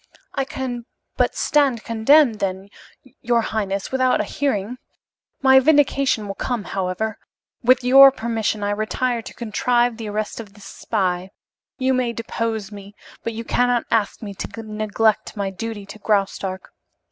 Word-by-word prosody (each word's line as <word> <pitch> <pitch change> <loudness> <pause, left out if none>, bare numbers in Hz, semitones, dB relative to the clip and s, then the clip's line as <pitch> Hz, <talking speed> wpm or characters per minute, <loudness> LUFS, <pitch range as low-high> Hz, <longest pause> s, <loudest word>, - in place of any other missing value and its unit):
"I 270 - -1
can 245 -3 -5 0.3
but - - +1
stand 275 -6 +2
condemned, 230 +1 +4
then, 190 0 -3 0.5
your 235 -1 +2
highness, 200 -3 -3
without 255 -1 +2
a - - +1
hearing. 250 -4 -2 0.6
My 265 0 +7
vindication 275 -5 +3
will 195 - -4
come, 240 +1 -3
however. 195 +4 -3 0.4
With 255 +1 +4
your 270 +2 +9
permission, 225 -4 -2
I 205 - 0
retire 230 +3 -1
to - - -10
contrive 240 +1 +1
the 225 -2 -5
arrest 210 +1 -3
of 210 -3 -9
this 205 -2 -14
spy. 185 -4 -2 0.5
You 260 -1 +1
may 250 -2 0
depose 225 -2 -3
me, 200 0 -11 0.3
but 230 - -3
you 230 +1 -5
cannot 245 +1 +1
ask 220 -1 0
me 200 -2 -6
to 225 +3 -7
neglect 215 0 0
my 195 -1 -2
duty 210 +1 -6
to 215 - -11
Graustark. 195 -2 -1
225 Hz, 150 wpm, -21 LUFS, 205-250 Hz, 0.6 s, your